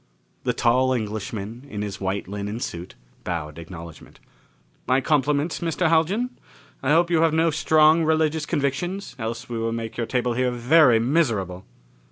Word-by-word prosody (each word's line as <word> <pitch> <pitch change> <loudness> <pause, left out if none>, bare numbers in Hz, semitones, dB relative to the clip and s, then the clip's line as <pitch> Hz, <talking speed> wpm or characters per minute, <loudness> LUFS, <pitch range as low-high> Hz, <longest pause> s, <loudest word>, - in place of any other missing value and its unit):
The - - +1
tall 130 +2 +2
Englishman, 110 +2 -5
in 105 -3 -4
his 100 -1 -6
white 95 0 -2
linen 105 +3 -4
suit, 85 -5 -6 0.3
bowed 80 -2 -4
acknowledgement. 85 -1 -11 0.7
"My 130 +1 +3
compliments, 145 +2 +1
Mr. 170 0 0
Haljan. 195 +10 +1 0.4
I 135 - -1
hope 170 +3 +3
you 165 -2 +3
have 165 -1 +3
no 165 0 +3
strong 155 +1 +4
religious 155 -1 +1
convictions, 170 +6 -2
else 115 +2 -4
we 120 -1 -4
will 115 0 -1
make 115 0 -5
your 115 -1 -2
table 125 -1 0
here 125 +1 +1
very 125 +1 +5
miserable!" 110 - 0
125 Hz, 155 wpm, -24 LUFS, 105-160 Hz, 0.7 s, very